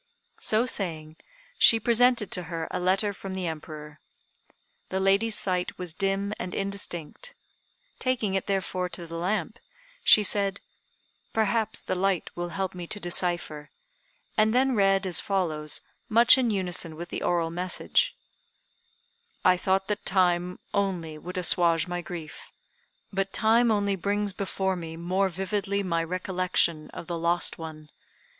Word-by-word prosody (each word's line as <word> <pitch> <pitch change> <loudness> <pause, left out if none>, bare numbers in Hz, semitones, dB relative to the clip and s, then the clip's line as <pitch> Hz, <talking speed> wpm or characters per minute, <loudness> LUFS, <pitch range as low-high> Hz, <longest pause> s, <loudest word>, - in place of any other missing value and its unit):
So 220 +3 +2
saying, 160 -9 -3 0.4
she 225 - +7
presented 235 -1 +3
to 180 - 0
her 165 -2 -3
a - - -2
letter 195 +3 +1
from 190 0 -7
the 185 -1 -3
Emperor. 155 -2 -7 0.9
The 190 - -1
lady's 200 +3 +3
sight 180 -2 -1
was 180 -3 -3
dim 195 +3 -1
and 180 - -5
indistinct. 200 - -3 0.6
Taking 240 -6 0
it, 195 - -1
therefore, 190 -2 -1
to 175 -1 -6
the 165 - -11
lamp, 190 +5 -2 0.4
she 210 - +7
said, 200 -1 +1 0.7
"Perhaps 220 0 0
the - - -2
light 185 -1 0
will 175 0 -4
help 190 +2 -3
me 175 -2 -7
to 210 - -3
decipher," 175 -4 -1 0.7
and 215 +1 +3
then 260 +1 +3
read 195 -2 +3
as 180 -3 +3
follows, 160 -6 -1 0.3
much 230 +2 +7
in 255 -3 +1
unison 180 -5 -1
with 170 +2 -7
the - - -4
oral 170 -2 0
message: 180 +1 +1 1.3
"I 185 - +6
thought 190 +1 0
that 210 0 -2
time 180 -1 +1 0.2
only 175 -6 -1
would 180 +4 -7
assuage 170 -1 +3
my 175 0 -3
grief; 170 -3 -9 0.6
but 195 0 -1
time 230 +2 +4
only 200 -2 +1
brings 200 +2 -1
before 190 0 -1
me 165 -2 -7
more 185 +3 0
vividly 200 +2 -2
my 170 -3 0
recollection 180 -2 0
of - - -8
the 170 -1 -4
lost 170 +1 +1
one. 155 -2 -8
185 Hz, 145 wpm, -27 LUFS, 170-200 Hz, 1.3 s, she